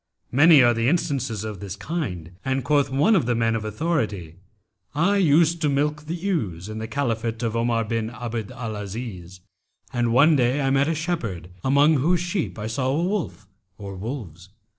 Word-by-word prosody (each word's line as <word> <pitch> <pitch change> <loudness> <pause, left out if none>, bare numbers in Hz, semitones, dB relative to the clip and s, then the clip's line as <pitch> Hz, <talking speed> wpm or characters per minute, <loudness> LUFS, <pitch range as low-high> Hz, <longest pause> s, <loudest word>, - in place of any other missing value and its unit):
Many 145 +1 +7
are 120 0 +5
the 115 +1 0
instances 135 - -1
of 105 -3 -6
this 100 -2 -6
kind, 100 - -4
and 130 0 -1
quoth 140 +1 +2
one 145 +12 +3
of 155 -11 +1
the 120 - +1
men 115 0 +1
of 110 - -2
authority, 105 - -2 0.6
'I 195 +7 +3
used 165 -1 +3
to 150 - +2
milk 150 +2 0
the 165 - -2
ewes 140 - -2
in 110 0 -6
the 110 - -4
Caliphate 115 -2 -2
of 115 -1 -1
Omar 115 0 +1
bin 115 0 -2
Abd 115 -2 -5
al 110 -3 -5
Aziz, 100 -4 -7 0.5
and 120 -2 +1
one 145 +7 +5
day 125 +1 +2
I 135 -1 +1
met 135 +1 +3
a 165 - 0
shepherd, 115 - -3
among 145 +3 +4
whose 170 +6 +2
sheep 175 - -2
I 105 - -5
saw 120 +4 -2
a - - 0
wolf 180 - -2 0.3
or 100 -2 -7
wolves. 95 - -7
120 Hz, 185 wpm, -24 LUFS, 110-150 Hz, 0.6 s, Many